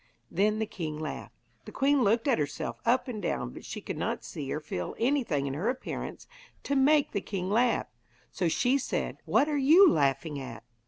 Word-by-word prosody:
Then 210 +4 +2
the 220 - 0
king 155 -7 -5
laughed. 155 - -6 0.3
The - - -9
queen 280 0 +2
looked 225 +5 +2
at 260 - +3
herself 145 -1 -3
up 255 +3 +3
and 225 -4 -5
down, 60 - -2
but - - -11
she - - -6
could - - -5
not - - -2
see 140 -3 -6
or - - -1
feel 90 - -5
anything 230 - +1
in 135 - -2
her 175 - -1
appearance 255 +1 -5 0.4
to 280 - -1
make 285 +2 +4
the 200 - -1
king 190 -2 -4
laugh, 240 +3 +2 0.5
so 180 - -1
she 250 - +2
said: - - -3
'What 290 - +3
are 295 -2 0
you 325 +9 +7
laughing 140 - +1
at?' 125 -3 -8
215 Hz, 200 wpm, -29 LUFS, -, 0.5 s, you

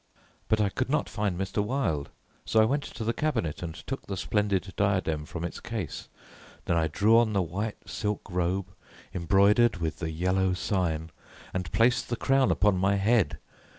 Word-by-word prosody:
but 110 - +2
I 105 -2 +3
could 130 +6 -2
not 150 - +1
find 105 -4 -2
Mr. 95 +2 -1
Wilde, 105 - -1 0.3
so 110 - +2
I 110 - +6
went 140 +6 +1
to 115 - -6
the 115 +1 0
cabinet 115 - -1
and 80 -2 -5
took 135 - -5
the 95 - -4
splendid 100 -2 0
diadem 95 -7 0
from 85 +1 -6
its 85 - -4
case. 115 -5 -5 0.6
Then 85 - +1
I 80 -1 +2
drew 105 +8 +4
on 115 -2 +1
the 100 - +2
white 100 +6 -4
silk 105 -2 -2
robe, 90 +1 -1 0.4
embroidered 100 +6 +4
with 80 -2 -3
the 80 - -2
Yellow 90 +3 +1
Sign, 85 -4 -1 0.4
and 90 -2 -3
placed 120 +1 +2
the 120 - 0
crown 135 +2 +2
upon 105 -2 +3
my 95 +2 +3
head. 100 - +2
100 Hz, 180 wpm, -28 LUFS, 90-110 Hz, 0.6 s, I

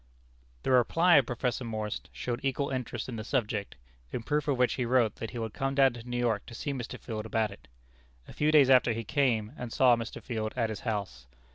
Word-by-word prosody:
The - - 0
reply 165 +8 +5
of 135 - +3
Professor 125 +1 -2
Morse 110 -2 -3
showed 120 0 -4
equal 135 +1 -1
interest 125 -3 -3
in 120 -3 -5
the 110 - -4
subject, 105 -5 -2 0.4
in 115 - -4
proof 150 +3 -1
of 140 -3 +1
which 125 0 +3
he 125 - -1
wrote 120 -3 +2
that 115 - -5
he - - -8
would 115 -2 -4
come 135 0 -2
down 135 -2 +5
to 120 - -8
New 120 - -2
York 115 -4 0
to 120 - -9
see 140 +4 -3
Mr. 125 -3 -6
Field 110 -3 -5
about 110 -1 0
it. 100 - -14 0.6
A - - -11
few 150 +1 +2
days 140 -4 +6
after 125 -2 +5
he 115 +1 -4
came, 110 -2 +1
and 125 -2 -5
saw 125 -1 +5
Mr. 115 0 -6
Field 110 -3 -4
at 115 -3 0
his 110 - -5
house. 100 - -4
120 Hz, 230 wpm, -29 LUFS, 110-130 Hz, 0.6 s, days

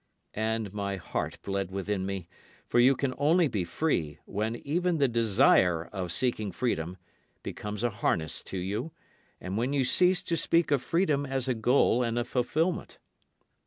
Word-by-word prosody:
And 110 -2 -2
my 100 -1 -2
heart 90 - -4
bled 100 -2 -2
within 95 0 -2
me; 95 -3 -4 0.4
for 120 - +1
you 130 +3 +6
can 130 0 -1
only 165 +4 +4
be 105 -9 -1
free 85 - -1
when 110 +3 -2
even 170 +7 -1
the 140 -2 +3
desire 95 -7 +3
of 90 -3 -3
seeking 110 -2 0
freedom 90 -8 -2 0.5
becomes 105 +1 -5
a 120 - +1
harness 85 -7 -1
to 95 - -5
you, 105 - -3 0.5
and 95 +3 -3
when 125 +4 0
you 140 -2 +2
cease 180 +7 +3
to 170 - -1
speak 165 -1 +2
of 140 -3 +3
freedom 155 -3 +1
as 135 -1 -1
a 130 - +2
goal 120 +1 +3
and 120 -1 -1
a 120 - 0
fulfilment. 155 +8 -1
115 Hz, 165 wpm, -28 LUFS, 100-140 Hz, 0.5 s, you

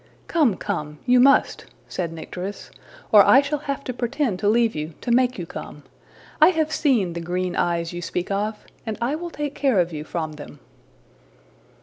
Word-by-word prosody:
'' - - -33
``Come, 280 - +2
come! 150 0 -4
you 250 0 +5
must,'' 275 +2 +4 0.2
said 170 -3 -3
Nycteris, 180 +4 -7 0.4
``or 205 -2 +9
I 260 - +7
shall 285 +1 -1
have 280 -1 -4
to 250 - -4
pretend 240 -4 -1
to 205 - +2
leave 230 0 +3
you, 155 +1 -5
to 240 - -3
make 250 +1 +3
you 175 - -4
come. 150 -2 -9 0.6
I 310 - +9
have 315 -3 0
seen 240 - +1
the 170 - -5
green 180 +1 -2
eyes 170 -1 0
you 175 - -5
speak 180 +2 -3
of, 210 +2 -2 0.2
and 220 -2 -4
I 240 +4 0
will 345 +3 -4
take 295 -3 -4
care 265 -9 +2
of 175 -1 0
you 150 -1 -5
from 155 0 -4
them.'' 145 -1 -11
210 Hz, 195 wpm, -23 LUFS, 170-270 Hz, 0.6 s, ``or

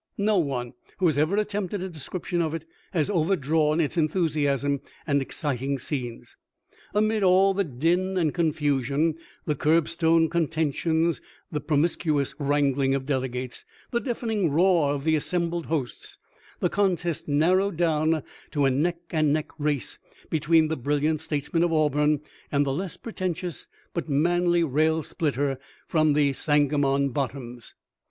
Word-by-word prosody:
No 205 -1 +2
one 130 -6 -2 0.2
who 185 - 0
has 160 -4 +3
ever 155 +6 +2
attempted 205 -2 -1
a - - -3
description 175 +2 -3
of 160 -1 -1
it 160 -1 -6 0.3
has 160 -6 +1
overdrawn 160 -4 +1
its 160 +1 0
enthusiasm 150 -4 +1 0.2
and 140 -2 +2
exciting 135 -1 -2
scenes. 125 -3 -5 0.6
Amid 215 +1 +2
all 190 +1 +5
the 200 +1 +1
din 175 +6 0
and 160 -5 +1
confusion, 150 -2 +1 0.3
the 150 - +1
curbstone 165 +2 +2
contentions, 160 0 0 0.3
the 150 -2 -2
pro 150 0 0
miscuous 155 -2 +1
wrangling 140 -2 +2
of 135 -1 -3
delegates, 130 -2 -3 0.3
the 235 - +1
deafening 225 - -1
roar 165 -1 +3
of 140 - -5
the 160 0 +3
assembled 170 +2 -1
hosts, 140 -8 -4 0.4
the - - +3
contest 180 -5 0
narrowed 175 +6 +2
down 160 -2 +1 0.3
to 145 -2 +1
a 135 - +4
neck 165 +6 +1
and 155 -3 +2
neck 155 0 0
race 145 -5 -2 0.3
between 160 +1 +3
the 160 0 -2
brilliant 145 +4 0
states 150 -2 -4
man 165 - +3
of 175 -1 +2
Auburn 150 -1 +2 0.3
and 145 0 +2
the 135 - -1
less 180 +4 -4
pretentious, 180 -5 -4 0.3
but 170 -2 -3
manly 175 +4 +2
rail 155 +2 +1
splitter 140 -3 -1 0.3
from 155 -2 +3
the 145 -1 +3
Sangamon 145 -1 +2
bottoms. 125 -3 -5
155 Hz, 145 wpm, -26 LUFS, 145-170 Hz, 0.6 s, all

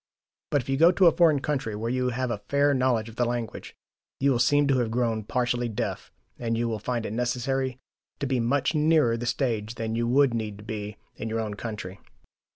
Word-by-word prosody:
But 145 - +2
if - - -19
you 135 - +1
go 165 +4 +7
in 180 - -1
a 170 - +8
foreign 160 -5 +4
country 135 -8 -2
where 115 +3 -2
you 125 0 0
have 125 0 -2
a 105 -3 -3
fair 140 0 +3
knowledge 125 -4 +1
of 115 0 -12
the 125 - +2
language, 120 -2 -4 0.4
you 140 +1 +3
will 120 - +1
seem 145 +4 +4
to 135 -2 +2
have 120 -2 0
grown 115 -2 0
partially 120 0 0
deaf, 105 - -4 0.3
and 115 -1 -1
you 120 +1 0
will 110 -2 -2
find 120 +1 -2
it 105 - -4
necessary 125 +2 -1 0.4
to - - -3
be 130 -2 0
much 135 +6 +1
nearer 150 -6 +3
the 120 +1 -4
stage 115 -4 -1
than 110 -1 -3
you 115 0 0
would 135 +1 +4
need 110 -3 -3
to 105 - -12
be 105 -1 -5 0.2
in 110 - -4
your 115 +1 -1
own 110 -2 -3
country. 105 -3 -6
120 Hz, 225 wpm, -26 LUFS, 115-135 Hz, 0.4 s, a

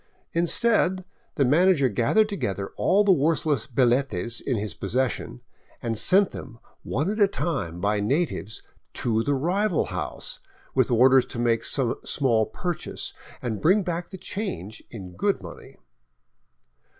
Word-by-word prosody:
Instead, 185 +1 +2 0.3
the 140 - +2
manager 155 +1 +4
gathered 120 - +2
together 100 - -3
all 200 +3 +3
the 200 - +4
worthless 155 - +1
hilletes 120 -4 +1
in 130 -4 -1
his 105 0 -3
possession 125 +3 -2 0.4
and 115 -1 -2
sent 190 - +4
tl^^em 115 -4 -9 0.2
one 145 +6 -2
at 215 - -4
a 200 - +7
time 135 - -3
by 105 +2 +1
natives 110 - -2 0.3
to 115 -2 0
the 145 +4 0
rival 180 +6 +1
house, 85 -5 -3 0.3
with - - +2
orders 130 +2 +5
to - - -8
make 120 -1 +1
some 130 -4 +1
small 115 -6 +1
purchase 175 -2 -4 0.3
and 110 -4 -3
bring 190 +5 +4
back 175 -1 -3
the 190 - -8
change 110 - -5
in 95 -6 -9
good 90 - 0
money. - - -11
135 Hz, 140 wpm, -25 LUFS, 115-175 Hz, 0.4 s, a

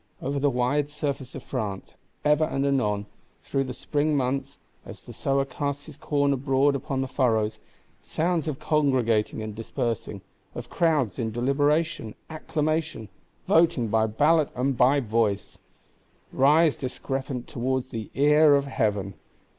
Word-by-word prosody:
Over 140 +1 -2
the 145 +1 +2
wide 135 +3 0
surface 140 -3 -4
of 135 - -7
France, 105 -7 -5 0.3
ever 150 +1 +4
and 140 -3 -1
anon, 105 -7 0 0.4
through 135 0 -1
the 130 - -5
spring 150 0 0
months, 135 +1 -2 0.3
as - - -12
the - - -10
Sower 135 0 0
casts 140 0 -4
his 155 - -11
corn 140 -1 +1
abroad 135 +1 +2
upon 135 -1 -2
the 135 - -2
furrows, 110 -5 0 0.4
sounds 165 0 -1
of 150 -4 -2
congregating 125 -9 +1
and 110 -1 -5
dispersing; 115 -2 -4 0.3
of 120 0 -7
crowds 150 - +1
in 115 - -1
deliberation, 140 +1 0 0.2
acclamation, 155 -6 -2 0.4
voting 160 -9 +3
by 110 +1 +2
ballot 150 +7 +3
and 130 +2 0
by 135 +4 +4
voice,—rise 130 +7 0
discrepant 130 -1 -4
towards 130 +1 -2
the 115 -4 -6
ear 150 +2 +5
of 140 0 +1
Heaven. 105 -7 -1
135 Hz, 140 wpm, -26 LUFS, 115-145 Hz, 0.4 s, ear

